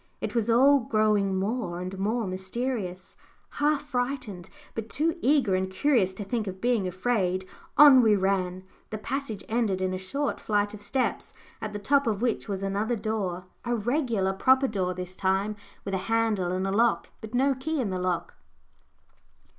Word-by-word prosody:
It - - -4
was 235 -1 0
all 275 +5 +6
growing 215 -4 +1
more 195 -3 -2
and 185 +1 -5
more 220 +4 0
mysterious; 190 0 -4 0.3
half 295 0 +1
frightened, 245 -9 -3 0.2
but 225 0 -5
too 320 +6 0
eager 265 -8 +3
and 185 0 0
curious 190 -2 +2
to 205 - -5
think 215 +1 -2
of 190 0 -5
being 230 -4 +1
afraid, 185 -1 0 0.3
on 285 -3 +9
we 220 -3 +5
ran. 185 -1 0 0.3
The 215 - -4
passage 245 -2 -4
ended 220 -5 0
in 185 0 -1
a 185 - -3
short 275 +10 -2
flight 205 -1 0
of 210 - -9
steps, 250 +6 -2 0.3
at 215 - -4
the 210 - -4
top 275 +6 +2
of 210 -3 0
which 235 -2 -1
was 195 -1 -3
another 205 +4 0
door, 200 -5 -3 0.2
a 240 0 0
regular 230 -4 0
proper 260 +7 +4
door 185 -5 -1
this 180 0 -6
time, 195 +3 0 0.3
with 195 - -4
a - - +2
handle 220 -6 +1
and 185 +1 -1
a 195 - -1
lock, 230 +3 +2
but 220 +1 -7
no 270 +2 +3
key 290 +4 -3
in 220 -7 -1
the 185 - -2
lock. 180 -1 -2
215 Hz, 180 wpm, -27 LUFS, 190-245 Hz, 0.3 s, on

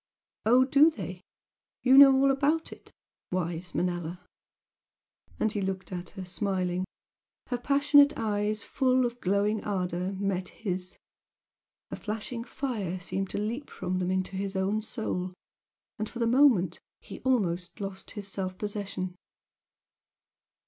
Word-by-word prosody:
"Oh, 250 +3 +6
do 280 +4 +6
they? 320 - -7 0.6
You 260 +1 +6
know 275 0 +11
all 275 +1 +4
about 295 +4 +1
it? - - -13 0.4
Wise 175 -1 -3
Manella!" 175 0 -1 1.2
And 220 - +2
he 205 - -2
looked 190 -1 -3
at 175 -1 -5
her, 190 - -5
smiling. 185 -1 -1 0.6
Her 245 -2 -1
passionate 285 +2 +5
eyes, 210 -1 -1
full 255 -1 +2
of 240 0 -4
glowing 200 +3 +1
ardour, 180 -1 -2
met 190 -1 -1
his, 185 -4 -4 0.9
a - - -2
flashing 225 +2 -5
fire 220 -9 -3
seemed 195 +1 -3
to - - -4
leap 230 +7 -3
from 185 0 -3
them 180 0 -1
into 185 +1 -1
his 195 0 -3
own 195 +3 +1
soul, 185 -5 -3 0.6
and 215 0 -2
for - - -9
the 235 - +1
moment 230 - +4 0.2
he - - -9
almost 185 -9 0
lost 195 -1 -6
his 205 -2 -6
self 185 -1 -4
possession. 200 -3 -4
200 Hz, 135 wpm, -29 LUFS, 185-245 Hz, 1.2 s, know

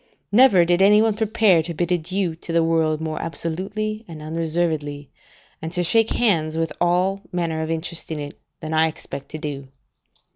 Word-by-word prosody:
Never 205 -6 +6
did 175 +2 +2
any 205 +2 +6
one 220 -1 +2
prepare 215 -5 +3
to 170 +1 -5
bid 175 +2 -1
adieu 180 +1 0
to 165 - -7
the 165 0 +3
world 160 -1 +1
more 155 -1 -3
absolutely 195 +7 -4
and 165 -3 -9
unreservedly, 155 -3 -2 0.5
and 160 +1 -5
to 180 0 0
shake 225 +6 +3
hands 160 -9 +1
with 165 0 -1
all 180 +3 +1
manner 165 -3 -2
of 160 - -3
interest 165 +1 -3
in 155 - -3
it, 145 0 -6 0.3
than 155 -1 -4
I 160 0 +4
expect 140 -3 -8
to 155 - -6
do. 145 -3 -6
165 Hz, 180 wpm, -22 LUFS, 160-190 Hz, 0.5 s, Never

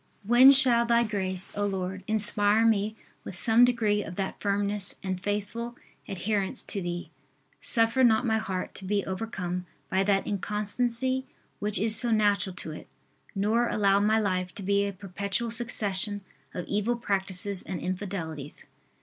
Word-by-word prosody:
When 240 +6 +7
shall 255 -4 +4
Thy 235 0 +3
grace, 190 -4 0
O 205 - -2
Lord, 190 -1 -3
inspire 215 0 +3
me 215 -1 +1 0.3
with - - -7
some 225 +5 +6
degree 220 -4 +2
of 170 - -9
that 195 0 -5
firmness 200 0 -1
and 185 -1 -4
faithful 210 +4 -4 0.3
adherence 200 +3 -2
to 200 - -5
Thee. 175 0 -5 0.5
Suffer 230 +2 +2
not 225 0 +3
my 220 -1 +1
heart 190 -4 -5
to 190 - -7
be 200 +1 -1
overcome 180 -3 -5 0.2
by 190 +1 +2
that 195 -1 +1
inconstancy 235 +6 -2 0.3
which 210 +1 0
is 220 +1 +4
so 235 +2 +4
natural 205 -4 +1
to 160 - -7
it, 155 - -10 0.5
nor 220 +5 +1
allow 200 -1 +2
my 215 +2 +2
life 185 -3 -2
to 200 - -7
be 200 +1 +1
a - - -3
perpetual 200 +4 -4
succession 210 -3 +3 0.3
of 180 - -6
evil 210 +4 -1
practices 195 -3 0
and 185 - -5
infidelities. 180 -6 -6
205 Hz, 155 wpm, -27 LUFS, 190-225 Hz, 0.5 s, When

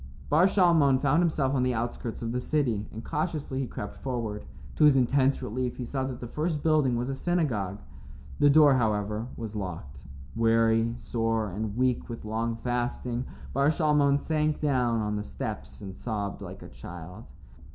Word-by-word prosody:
II 65 - -13 0.2
Bar 165 +5 +6
Shalmon 170 -9 +4
found 145 +5 +3
himself 150 -6 +1
on 130 - +2
the 125 -1 +1
outskirts 120 0 -4
of 115 - -2
the 125 +1 -1
city, 125 -8 0
and 110 +1 -8
cautiously 150 -4 -2
he 135 - -1
crept 105 -2 -6
forward. 115 -5 -4 0.3
To 155 - +6
his 145 -2 +7
intense 135 +1 +2
relief, 125 +2 -3
he 125 - -4
saw 135 +2 -2
that 130 -2 -5
the 120 - -6
first 155 +3 -2
building 150 -6 +3
was 120 +1 -1
a 135 - -2
synagogue. 130 - -1 0.6
The 145 - +6
door, 145 -1 +7
however, 105 -1 0
was 110 -2 -6
locked. 85 -10 -6 0.3
Weary, 115 0 +3
sore, 115 -3 -1
and 105 +3 -4
weak 125 -1 +1
with 115 -2 -7
long 115 +2 -1
fasting, 120 +1 -2 0.3
Bar 140 +1 +3
Shalmon 150 -3 +3
sank 155 0 0
down 125 -6 +1
on 105 0 -1
the 105 - -3
steps 65 -6 -6
and 95 -2 -7
sobbed 105 -4 -4
like - - -8
a - - -9
child. 90 +5 -10
125 Hz, 180 wpm, -28 LUFS, 110-140 Hz, 0.6 s, his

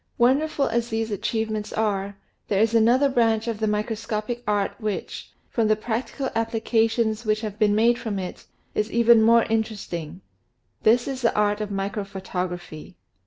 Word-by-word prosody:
Wonderful 275 +4 +2
as 235 0 -1
these 225 0 -2
achievements 215 +1 -2
are, 200 -2 -1 0.3
there 195 - +1
is 225 +1 +3
another 240 +5 +4
branch 230 -3 +1
of 225 -2 -2
the 220 - 0
microscopic 215 +2 -2
art 205 -1 +1
which, 210 -2 -4 0.2
from 230 -2 0
the 215 - +4
practical 240 +5 -3
applications 225 0 +1
that 215 -2 0
have 215 -1 -6
been 210 -2 +3
made 235 +2 +3
of 205 -2 -2
it, 185 -1 -6 0.3
is 210 +1 -1
even 235 0 +5
more 230 +1 +5
inter 220 0 -1
esting. 170 -3 -7 0.6
This 235 +2 +3
is 265 -2 -4
the 230 - +2
art 210 0 +1
of 210 - -3
microphotography. 190 -4 -5
220 Hz, 160 wpm, -24 LUFS, 205-230 Hz, 0.6 s, even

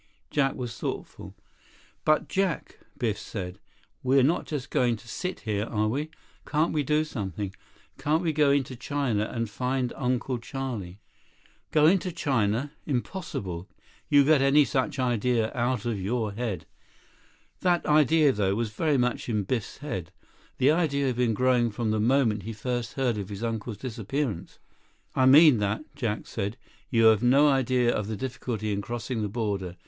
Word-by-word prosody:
Jack 135 -2 +1
was 120 -3 -5
thoughtful. - - -6 0.7
"But 155 0 +3
Jack," 190 -3 -1 0.2
Biff 110 -5 -1
said, 95 -3 -6 0.4
"we're 130 +1 +4
not 160 +6 +1
just 145 -4 -4
going 120 -2 +2
to 115 +2 -15
sit 180 - -4
here, 105 -2 -1
are 110 -1 0
we? 145 +8 -2 0.3
Can't 155 +2 0
we 150 - +1
do 150 +2 +2
something? 100 - -4 0.5
Can't 155 +4 +1
we 160 -2 +1
go 150 -1 +4
into 140 -2 +1
China 125 -5 -1
and 115 -1 -2
find 125 +3 -2
Uncle 125 0 -1
Charlie?" 115 -8 -5 0.7
"Go 150 -1 +4
into 185 +2 +3
China? 130 -3 0 0.2
Impossible. 110 - -4 0.4
You 145 -1 +6
get 150 0 +4
any 140 +2 +5
such 130 0 -1
idea 120 -2 +1
out 120 -2 -1
of 110 -5 -2
your 110 +2 -1
head." 110 -2 -4 0.9
That 175 -1 +1
idea, 150 0 +5
though, 100 -4 0
was 115 -1 -2
very 150 +5 +1
much 125 0 0
in 105 -3 0
Biff's 115 +2 -3
head. 90 - -4 0.5
The 135 +3 +4
idea 150 -4 +1
had 130 -2 0
been 120 -3 +2
growing 125 0 +3
from 110 +1 -2
the 110 - 0
moment 115 -2 +2
he 115 +2 -6
first 120 +1 -3
heard 125 -5 0
of 100 -1 -5
his 100 +2 -6
uncle's 115 -1 -3
disappearance. 120 - -4 0.6
"I 130 - +3
mean 145 -2 +8
that," 105 +6 -1
Jack 115 -6 -2
said. 100 +5 -4 0.3
"You 115 -3 +3
have 110 -1 +6
no 135 +4 +5
idea 130 -3 +2
of 105 - -2
the 110 -1 -3
difficulty 120 -4 -3
in 100 - -2
crossing 120 +1 -4
the 105 - -1
border. 100 -5 -3
125 Hz, 165 wpm, -27 LUFS, 110-140 Hz, 0.9 s, mean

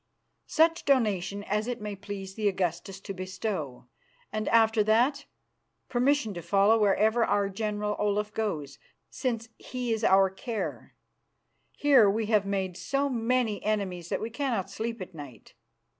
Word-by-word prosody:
"Such 330 +1 +3
donation 205 -7 +1
as 210 +2 -1
it 245 -1 -3
may 210 -1 -5
please 195 -1 -7
the 215 0 -1
Augustus 185 0 -2
to 195 - -6
bestow, 185 - -4 0.5
and 215 0 -2
after 225 -1 +4
that 250 +7 +2 0.6
permission 250 -3 +1
to 175 - -6
follow 200 +6 +3
wherever 215 +3 +3
our 205 -2 +1
General 210 +1 -2
Olaf 210 0 0
goes, 160 -11 -3 0.3
since 230 -3 -3
he 250 -2 -3
is 220 0 -3
our 195 -2 +5
care. 220 +3 -5 0.8
Here 270 -8 +6
we 220 +2 0
have 210 -2 +2
made 190 -2 -2
so 280 0 -1
many 240 -3 0
enemies 190 -5 -2
that - - -1
we 225 - -4
cannot 240 -6 -2
sleep 225 -2 -4
at 185 - -13
night." 140 -8 -11
210 Hz, 145 wpm, -28 LUFS, 195-230 Hz, 0.8 s, Here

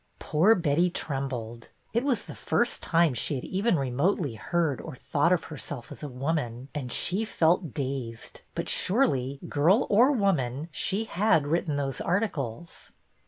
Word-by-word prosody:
Poor 185 +9 +3
Betty 170 0 +2
trembled. 130 -7 -4 0.2
It 235 +2 +1
was 260 -7 +1
the - - -8
first 240 0 0
time 165 -4 +3
she 125 +5 -1
had 125 - -4
even 195 0 +1
remotely 140 - 0
heard 160 +3 -1
or - - -8
thought 145 +6 +1
of 180 -3 +2
herself 145 -4 -7
as - - -9
a 150 - -4
woman, 130 -2 -3
and 130 -5 -4
she 190 - +1
felt 170 - +1
dazed; 130 -4 -4
but - - -3
surely, 140 - +1
girl 175 - +3
or 240 +7 +6
woman, 165 - 0
she 195 +7 0
had 210 -6 +2
written 155 0 0
those 140 -2 -2
articles. 170 - -3
155 Hz, 155 wpm, -27 LUFS, 135-185 Hz, 0.2 s, or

